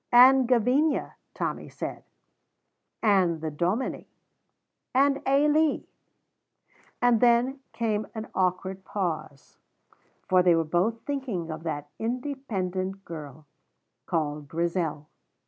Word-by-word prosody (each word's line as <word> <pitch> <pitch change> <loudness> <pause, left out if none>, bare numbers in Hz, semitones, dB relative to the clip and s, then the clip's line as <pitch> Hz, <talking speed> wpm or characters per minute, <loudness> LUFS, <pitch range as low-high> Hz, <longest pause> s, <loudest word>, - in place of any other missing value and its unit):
"And 255 +1 +7
Gavinia," 255 +5 +2 0.2
Tommy - - -3
said, - - -6 1.0
"and 185 -6 +3
the 155 0 -3
Dominie." 180 - -1 0.9
"And 275 +1 +3
Ailie." 295 +3 +3 1.2
And 245 -2 +4
then 245 +3 +3
came 215 -2 -1
an 220 0 -5
awkward 185 +1 -1
pause, 155 -9 -4 0.7
for 185 0 +5
they 175 -2 +5
were 165 - +2
both 180 +8 0
thinking 245 - -3
of 155 - -6
that 145 -2 -4
independent 205 -7 -3
girl 155 -2 -9 0.6
called 150 -4 -2
Grizel. 165 -2 -2
195 Hz, 100 wpm, -27 LUFS, 165-250 Hz, 1.2 s, And